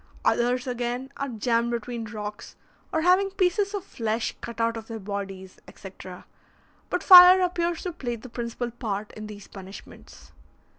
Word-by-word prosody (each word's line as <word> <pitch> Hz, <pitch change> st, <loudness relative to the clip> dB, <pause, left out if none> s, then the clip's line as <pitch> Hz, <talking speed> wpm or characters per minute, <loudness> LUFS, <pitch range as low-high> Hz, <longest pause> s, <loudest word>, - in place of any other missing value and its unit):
Others 245 Hz, +1 st, +1 dB
again, 245 Hz, +1 st, -3 dB
are 280 Hz, 0 st, -3 dB
jammed 235 Hz, 0 st, 0 dB
between 235 Hz, 0 st, -4 dB
rocks, 210 Hz, 0 st, -7 dB, 0.4 s
or 320 Hz, -, 0 dB
having 365 Hz, +3 st, +4 dB
pieces 390 Hz, +2 st, 0 dB
of 400 Hz, -, -4 dB
flesh 225 Hz, -, -3 dB
cut 235 Hz, -1 st, -8 dB
out 230 Hz, 0 st, +1 dB
of 225 Hz, -1 st, -8 dB
their 230 Hz, -, -6 dB
bodies, 195 Hz, -2 st, -7 dB
etc., 185 Hz, -2 st, -11 dB, 0.6 s
but -, -, -2 dB
fire 365 Hz, 0 st, +10 dB
appears 345 Hz, -2 st, -1 dB
to 360 Hz, -, -3 dB
play 250 Hz, -8 st, -4 dB
the 235 Hz, +3 st, -11 dB
principal 240 Hz, 0 st, -5 dB
part 215 Hz, -3 st, -4 dB
in 215 Hz, 0 st, -9 dB
these 205 Hz, -1 st, -11 dB
punishments. 195 Hz, 0 st, -13 dB
235 Hz, 155 wpm, -25 LUFS, 215-320 Hz, 0.6 s, fire